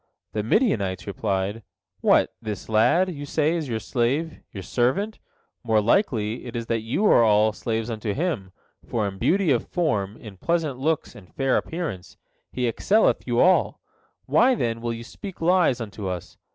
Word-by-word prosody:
The 105 - 0
Midianites 100 - +1
replied: 100 +2 -2 0.4
"What, - - +3
this 105 -2 -5
lad, 170 +12 +3
you 145 -2 -7
say, 155 +2 +1
is 160 -5 -3
your 115 - -1
slave, 135 +8 -1
your 95 - -7
servant? 130 - 0 0.4
More 110 -2 +3
likely 115 - +1
is 115 0 -4
it - - -18
that 115 -1 0
you 115 - -1
all 110 - +5
are - - -6
slaves 115 0 -2
unto 110 -1 -3
him, 140 - -2 0.3
for 110 -3 -1
in 95 -1 -7
beauty 185 - +2
of 120 - +1
form, 110 - -1
in 105 -4 -11
pleasant 155 - -1
looks, 155 +3 -1
and 90 -5 -15
fair 135 -1 +1
appearance, 150 - -4 0.3
he 125 -1 -1
excelleth 200 - +2
you 120 -1 +1
all. 185 0 +3 0.5
Why, 255 +1 +4
then, 115 - -2
will 120 0 -2
you 115 0 -6
speak 195 - -9
lies 170 -6 +3
unto 105 -3 -6
us? 90 -2 -5
120 Hz, 170 wpm, -24 LUFS, 105-160 Hz, 0.5 s, all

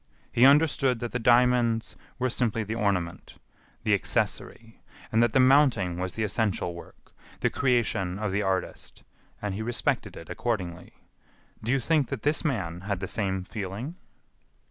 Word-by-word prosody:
He 125 +2 +6
understood 140 -4 +4
that 120 0 -4
the 125 - -2
diamonds 120 -1 +3 0.2
were 130 0 0
simply 115 -2 0
the 110 +1 -4
ornament, 95 -6 -2 0.5
the - - +2
accessory, 115 -1 -2 0.3
and 110 - +3
that 120 -1 +2
the - - +4
mounting 130 -10 +4
was 90 0 -3
the 110 - -1
essential 105 -4 0
work, 85 - -14 0.3
the - - +2
creation 110 -8 0
of 105 -1 -2
the 100 +2 0
artist, 95 -2 -3 0.4
and 105 -2 -2
he 100 - -4
respected 120 +2 -1
it - - -10
accordingly. 90 -7 -3 0.7
Do 115 - -2
you 135 - +3
think 150 +1 +1
that 135 -6 -5
this 150 +1 +1
man 95 - -2
had 100 0 -3
the 95 - -4
same 95 -3 -1
feeling?" 105 - -5
115 Hz, 160 wpm, -27 LUFS, 95-125 Hz, 0.7 s, He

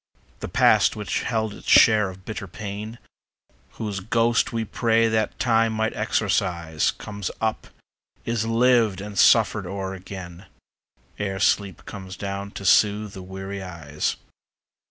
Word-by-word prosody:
The - - -5
past - - +4
which 105 -2 -2
held 110 -3 -1
its - - -9
share 105 -3 +6
of 95 0 -12
bitter 110 -2 -6
pain, 105 +4 -7 0.8
Whose 105 -3 -4
ghost 115 +3 +1
we 115 -1 -2
prayed 115 +1 +2
that 110 -1 0
Time 115 -2 +2
might 110 0 -1
exorcise, 85 -4 0
Comes 100 -2 -5
up, 110 -1 -2 0.6
is 115 -1 -1
lived 115 -4 +3
and 100 +1 -7
suffered 105 -2 +4
o'er 95 0 -4
again, 95 -1 -9 0.7
Ere 95 -2 -2
sleep 100 -4 +1
comes 95 -2 -8
down 100 0 -4
to 100 - -9
soothe 105 +2 +3
the 95 - -8
weary 95 +1 -7
eyes. 80 -5 -3
100 Hz, 135 wpm, -24 LUFS, 95-110 Hz, 0.8 s, share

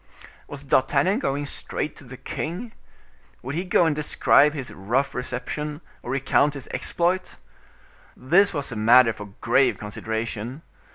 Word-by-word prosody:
Was 145 -1 -8
D'Artagnan 140 - +2
going 145 - -1
straight 145 +1 -4
to - - -13
the 130 0 -11
king? 180 - -5 0.7
Would 130 +3 -5
he 170 +4 -1
go 180 -2 +3
and 160 -2 +1
describe 150 0 +3
his 135 -4 -5
rough 120 +9 -1
reception, 145 +4 -4 0.2
or - - -9
recount 140 +2 +2
his 135 -2 -7
exploit? 180 +2 -1 0.8
This 185 +10 +3
was 145 -6 -3
a - - -5
matter 115 +2 +5
for 105 -2 -11
grave 135 -1 +3
consideration. 110 +5 -5
140 Hz, 145 wpm, -24 LUFS, 125-155 Hz, 0.8 s, matter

